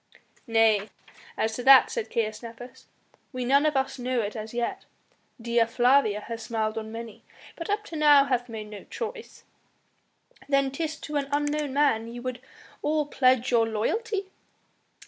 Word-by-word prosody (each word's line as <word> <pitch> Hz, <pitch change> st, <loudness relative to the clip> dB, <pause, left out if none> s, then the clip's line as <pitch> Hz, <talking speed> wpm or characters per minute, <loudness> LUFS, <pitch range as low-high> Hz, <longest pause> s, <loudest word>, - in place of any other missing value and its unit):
"Nay, 225 Hz, -2 st, +3 dB, 0.5 s
as 220 Hz, 0 st, 0 dB
to 245 Hz, -, -4 dB
that," 265 Hz, 0 st, +8 dB
said 470 Hz, -3 st, -3 dB
Caius 215 Hz, -2 st, -2 dB
Nepos, 235 Hz, +1 st, -11 dB, 0.4 s
"we 255 Hz, -1 st, -4 dB
none 280 Hz, +4 st, +4 dB
of 300 Hz, -2 st, +1 dB
us 265 Hz, 0 st, -1 dB
know 250 Hz, -1 st, 0 dB
it 210 Hz, +1 st, -4 dB
as 215 Hz, 0 st, -6 dB
yet! 240 Hz, 0 st, -3 dB, 0.5 s
Dea 235 Hz, 0 st, +2 dB
Flavia 240 Hz, -2 st, +3 dB
has 230 Hz, +1 st, -7 dB
smiled 220 Hz, -2 st, -2 dB
on 220 Hz, 0 st, -5 dB
many, 230 Hz, -1 st, -8 dB, 0.3 s
but 335 Hz, -, -7 dB
up 420 Hz, +1 st, 0 dB
to 335 Hz, -, -8 dB
now 295 Hz, -2 st, +6 dB
hath 250 Hz, -3 st, -1 dB
made 215 Hz, -2 st, -7 dB
no 205 Hz, -, -9 dB
choice." 465 Hz, 0 st, -7 dB, 1.1 s
"Then 275 Hz, -1 st, +2 dB
'tis 315 Hz, +2 st, -4 dB
to 300 Hz, -1 st, -3 dB
an 280 Hz, -1 st, -1 dB
unknown 290 Hz, -1 st, -1 dB
man 270 Hz, -6 st, +2 dB
ye 235 Hz, +1 st, -8 dB
would 250 Hz, 0 st, -5 dB, 0.4 s
all 305 Hz, 0 st, 0 dB
pledge 255 Hz, -3 st, +2 dB
your 230 Hz, -2 st, +3 dB
loyalty?" 390 Hz, -, -2 dB
250 Hz, 165 wpm, -26 LUFS, 225-290 Hz, 1.1 s, that